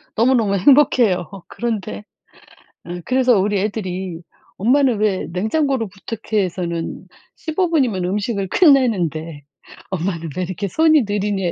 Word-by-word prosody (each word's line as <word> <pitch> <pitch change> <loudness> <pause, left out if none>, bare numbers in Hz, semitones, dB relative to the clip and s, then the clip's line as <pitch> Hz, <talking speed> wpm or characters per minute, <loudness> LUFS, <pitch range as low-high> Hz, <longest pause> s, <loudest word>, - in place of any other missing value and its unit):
너무너무 230 -3 +2
행복해요. 230 - +4 0.2
그런데 200 - -4 0.8
어 175 +1 -6
그래서 255 -4 +3
우리 200 0 +1
애들이 185 -4 -4 0.4
"엄마는 250 +3 +3
왜 205 -3 0
냉장고를 225 - 0
부탁해에서는 185 -4 -4 0.3
15 335 +3 -1
분이면 250 - +1
음식을 200 +1 -2
끝내는데 180 - +2 0.5
엄마는 170 -3 -3
왜 185 - 0
이렇게 190 +3 -4
손이 315 - +4
느리녜요." 200 -3 -1
205 Hz, 295 characters per minute, -19 LUFS, 180-245 Hz, 0.8 s, 행복해요